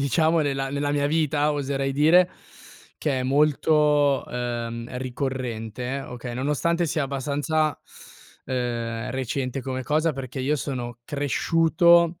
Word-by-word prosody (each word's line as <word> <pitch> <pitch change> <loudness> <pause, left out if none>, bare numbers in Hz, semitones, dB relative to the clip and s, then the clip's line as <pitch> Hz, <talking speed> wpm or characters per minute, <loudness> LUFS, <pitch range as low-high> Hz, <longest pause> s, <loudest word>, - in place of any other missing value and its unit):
diciamo 160 +4 +2
nella 135 -2 -1
nella 145 +1 -1
mia 145 0 +1
vita, 150 -1 +1
oserei 135 -1 -1
dire, 160 +6 +5 0.7
che 140 -4 -1
è - - -1
molto, 150 0 +3
ehm, 120 0 -4
ricorrente, 125 -1 -3
okay, 125 -2 -7
nonostante 150 +6 0
sia 155 -1 0
abbastanza, 145 +3 -1 0.7
ehm, 120 -3 -2
recente 130 0 -2
come 130 0 -4
cosa 155 +5 +1
perché 130 0 -5
io 145 +4 +1
sono 120 -4 -5
cresciuto 165 +4 +3
140 Hz, 120 wpm, -24 LUFS, 125-150 Hz, 0.7 s, dire